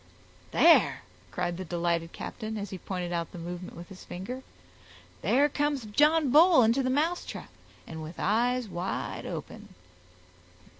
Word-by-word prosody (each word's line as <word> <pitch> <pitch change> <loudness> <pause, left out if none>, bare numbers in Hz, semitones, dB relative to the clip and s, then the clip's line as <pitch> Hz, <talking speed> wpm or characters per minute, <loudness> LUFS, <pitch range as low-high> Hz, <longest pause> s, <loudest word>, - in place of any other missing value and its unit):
"There," 240 - +5 0.3
cried 175 -1 -2
the 185 - -4
delighted 170 -1 -1
captain, 220 -1 -6
as 200 -2 -5
he 190 - -6
pointed 180 -2 -4
out 170 -1 -2
the - - -9
movement 175 +1 -7
with 175 +3 -10
his 190 -2 -11
finger, 220 +9 -6 0.8
"there 285 +3 +3
comes 290 -3 -1
John 295 +6 +3
Bull 320 -2 +7
into 230 +5 +3
the 255 - 0
mousetrap, 315 +7 -2 0.3
and 160 -1 -8
with 155 +2 -8
eyes 240 +4 +1
wide 180 -1 -4
open." - - -8
210 Hz, 145 wpm, -28 LUFS, 175-265 Hz, 0.8 s, Bull